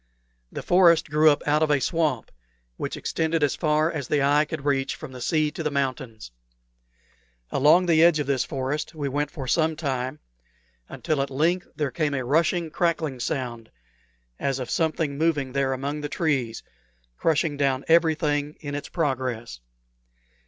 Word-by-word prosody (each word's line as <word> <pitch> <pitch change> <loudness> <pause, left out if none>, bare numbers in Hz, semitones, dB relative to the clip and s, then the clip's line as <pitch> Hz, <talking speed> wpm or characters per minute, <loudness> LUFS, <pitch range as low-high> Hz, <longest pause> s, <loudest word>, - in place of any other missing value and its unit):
The - - -6
forest 170 -4 +4
grew 155 +1 +5
up 145 -1 +1
out 150 +1 +2
of 155 - +2
a 145 -1 +3
swamp, 165 +2 -1 0.4
which - - -4
extended 160 -1 -1
as 145 - +2
far 155 0 +1
as 145 -5 -4
the 145 -2 +1
eye 145 +2 +3
could 150 -1 -6
reach 135 -2 0
from 155 -4 -9
the 125 -1 -9
sea 155 +3 +1
to 160 - -6
the 155 - 0
mountains. 130 - -3 1.2
Along 155 +6 +4
the 165 -2 +4
edge 170 -2 +5
of 150 - -1
this 135 -1 +1
forest 145 +3 -4
we 145 -2 -3
went 145 +1 -1
for 135 -5 -7
some 160 +3 +2
time, 135 -3 -3 0.7
until 150 -3 -2
at 135 - -2
length 165 +7 0
there 150 -4 -2
came 150 -2 -1
a 130 -2 -2
rushing, 165 +4 +1
crackling 160 -6 -1
sound, 120 -3 -4 0.7
as 135 -1 -1
of 125 -2 -5
something 160 -3 -1
moving 150 -5 +1
there 135 0 0
among 140 +3 -3
the 145 - -4
trees, 135 -9 -1 0.5
crushing 155 - +1
down 135 -2 0
everything 155 -3 +2
in 145 -2 -6
its 145 0 -5
progress. 130 - -2
145 Hz, 165 wpm, -25 LUFS, 135-160 Hz, 1.2 s, grew